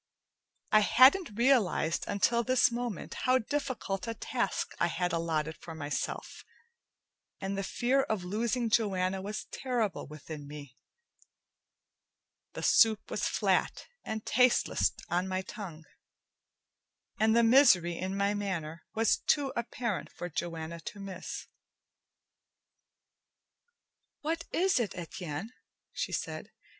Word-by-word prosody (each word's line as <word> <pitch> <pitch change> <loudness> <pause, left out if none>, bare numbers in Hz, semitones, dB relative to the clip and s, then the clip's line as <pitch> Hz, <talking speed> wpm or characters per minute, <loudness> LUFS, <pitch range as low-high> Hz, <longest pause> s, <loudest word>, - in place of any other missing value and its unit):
I 215 - +7
hadn't 255 - +5
realized 225 - +2
until 235 +4 +2
this 255 0 +3
moment 240 -4 -4
how 255 0 +5
difficult 230 -7 -3
a 230 - -3
task 235 -2 -2
I 170 - +3
had 175 +1 -1
allotted 160 -2 -1
for 165 - -9
myself, 145 -2 -4 1.0
and 195 0 -3
the 195 - -1
fear 255 +7 +1
of 215 -7 -2
losing 225 +5 -1
Joanna 190 -4 +1
was 205 +2 -5
terrible 240 -6 -2
within 150 0 -9
me. 145 -3 -10 1.8
The - - -6
soup 220 -2 +4
was - - 0
flat - - +1 0.2
and 220 -1 -5
tasteless 250 +1 +3 0.2
on 180 +2 0
my 185 0 -2
tongue, 175 -6 -8 1.4
and 220 +1 +4
the 235 - +5
misery 225 -9 +6
in 190 +3 -3
my 200 +1 +2
manner 170 -6 -3
was 225 +1 +3
too 280 -3 +1
apparent 235 -3 -3
for 175 - -6
Joanna 165 0 -4
to 200 +5 -8
miss. 195 -2 -6 2.8
"What 330 +2 -2
is 375 -4 +2
it, 225 -5 -2
Etienne?" 175 +3 -6 0.4
she - - -3
said. - - -4
200 Hz, 120 wpm, -30 LUFS, 175-235 Hz, 2.8 s, I